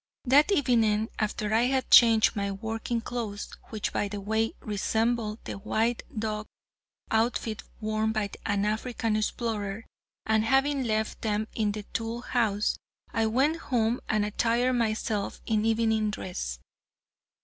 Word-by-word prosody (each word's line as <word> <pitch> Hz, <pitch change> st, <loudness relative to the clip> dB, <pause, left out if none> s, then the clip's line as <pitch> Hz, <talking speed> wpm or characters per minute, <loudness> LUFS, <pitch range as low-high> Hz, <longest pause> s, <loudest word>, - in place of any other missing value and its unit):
That 285 Hz, +8 st, +5 dB
evening, 225 Hz, -, +2 dB
after 210 Hz, 0 st, -1 dB
I 230 Hz, +2 st, +4 dB
had 265 Hz, 0 st, -1 dB
changed 225 Hz, -3 st, +7 dB
my 200 Hz, -1 st, -1 dB
working 225 Hz, +3 st, -3 dB
clothes, 225 Hz, -4 st, -4 dB, 0.2 s
which 215 Hz, -2 st, -4 dB
by 205 Hz, -, 0 dB
the 205 Hz, 0 st, -5 dB
way, 220 Hz, +3 st, 0 dB
resembled 220 Hz, +1 st, 0 dB
the -, -, -6 dB
white 225 Hz, +3 st, 0 dB, 0.2 s
duck 215 Hz, -1 st, -2 dB, 0.6 s
outfit 225 Hz, -1 st, 0 dB, 0.2 s
worn 215 Hz, 0 st, 0 dB
by 215 Hz, -2 st, -1 dB
an 205 Hz, 0 st, 0 dB
African 220 Hz, +1 st, -1 dB
explorer, 215 Hz, -1 st, -2 dB, 0.4 s
and, 220 Hz, 0 st, +3 dB
having 270 Hz, +3 st, +2 dB
left 220 Hz, -1 st, -1 dB
them 215 Hz, 0 st, 0 dB
in 210 Hz, -2 st, 0 dB
the 210 Hz, 0 st, -5 dB
tool 225 Hz, +3 st, -4 dB
house, 215 Hz, -5 st, 0 dB, 0.3 s
I 225 Hz, -1 st, +2 dB
went 270 Hz, +8 st, +2 dB
home 235 Hz, -1 st, +1 dB
and 215 Hz, -1 st, +2 dB
attired 235 Hz, +4 st, +1 dB
myself 215 Hz, -3 st, -1 dB
in 220 Hz, -1 st, +1 dB
evening 220 Hz, -1 st, +2 dB
dress. 180 Hz, -, -4 dB
220 Hz, 140 wpm, -28 LUFS, 210-235 Hz, 0.6 s, changed